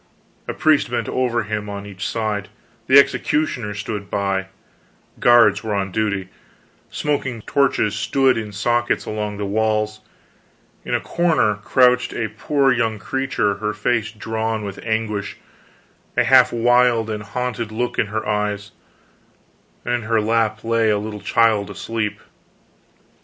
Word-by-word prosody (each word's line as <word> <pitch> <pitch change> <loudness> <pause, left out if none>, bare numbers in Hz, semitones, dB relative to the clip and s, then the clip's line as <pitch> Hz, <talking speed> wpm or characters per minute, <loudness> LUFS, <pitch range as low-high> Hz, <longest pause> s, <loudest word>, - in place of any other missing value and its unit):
A - - -3
priest 155 -5 +3
bent 120 - -2
over 120 -2 0
him 105 0 -4
on 100 0 -6
each 100 -1 -5
side; 105 -3 -2 0.4
the 135 - +7
executioner 140 -6 +2
stood 105 -1 -5
by; 95 -1 -1 0.7
guards 115 -4 +5
were 110 -2 -2
on 95 -1 -2
duty; 100 -2 -1 0.6
smoking 130 -6 -2
torches 135 -7 +1
stood 130 +6 +2
in 110 -2 -4
sockets 120 +4 0
along 105 -1 -4
the 105 - -3
walls; 110 +1 0 0.8
in - - -1
a - - +1
corner 165 -11 +1
crouched 125 +4 +2
a 110 -2 -2
poor 135 +3 +2
young 115 -3 0
creature, 120 -5 -1
her 105 +1 -2
face 110 +1 0
drawn 110 0 -3
with 100 -2 -6
anguish, 110 -2 -2 0.8
a - - +5
half 125 -1 +6
wild 120 -1 +3
and 105 -1 -4
hunted 115 +1 -4
look 120 +3 -2
in - - +2
her 110 +1 -4
eyes, 105 -1 -2 1.1
and 120 - -1
in 120 - 0
her 115 0 +1
lap 110 0 0
lay 115 -1 +2
a 105 - +2
little 105 0 -6
child 110 -3 +2
asleep. 110 -2 -3
110 Hz, 140 wpm, -21 LUFS, 105-120 Hz, 1.1 s, the